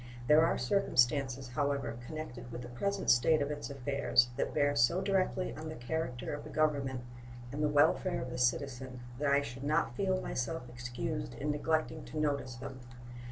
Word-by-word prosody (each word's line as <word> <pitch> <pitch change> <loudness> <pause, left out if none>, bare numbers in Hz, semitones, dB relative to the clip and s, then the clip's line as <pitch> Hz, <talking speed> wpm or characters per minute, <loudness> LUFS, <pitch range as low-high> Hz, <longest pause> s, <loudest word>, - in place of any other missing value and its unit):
There 150 +5 +6
are 165 - +2
circumstances, 130 -4 +2
however, 140 -2 -1
connected 125 -6 -7
with 120 +1 -6
the 120 - -8
present 200 +11 +1
state 155 +6 +4
of 140 +1 -1
its 145 0 -5
affairs 140 -2 +2
that 140 - -1
bear 145 0 +2
so 130 +10 +4
directly 190 -1 0
on 155 0 -6
the 155 - -6
character 125 -1 -3
of 145 - -5
the - - -9
Government 140 -4 +1 0.5
and 145 - -3
the 150 - +3
welfare 155 +5 +3
of 125 0 -5
the 125 - -4
citizen 125 0 -1 0.2
that 145 -1 +2
I 140 0 +4
should 125 +1 -7
not 145 -4 +1
feel 190 +2 +1
myself 125 -2 -3
excused 120 - -4
in 150 +1 -1
neglecting 155 +2 0
to 155 - -5
notice 140 -4 0
them. 130 +1 -7
140 Hz, 180 wpm, -33 LUFS, 125-155 Hz, 0.5 s, There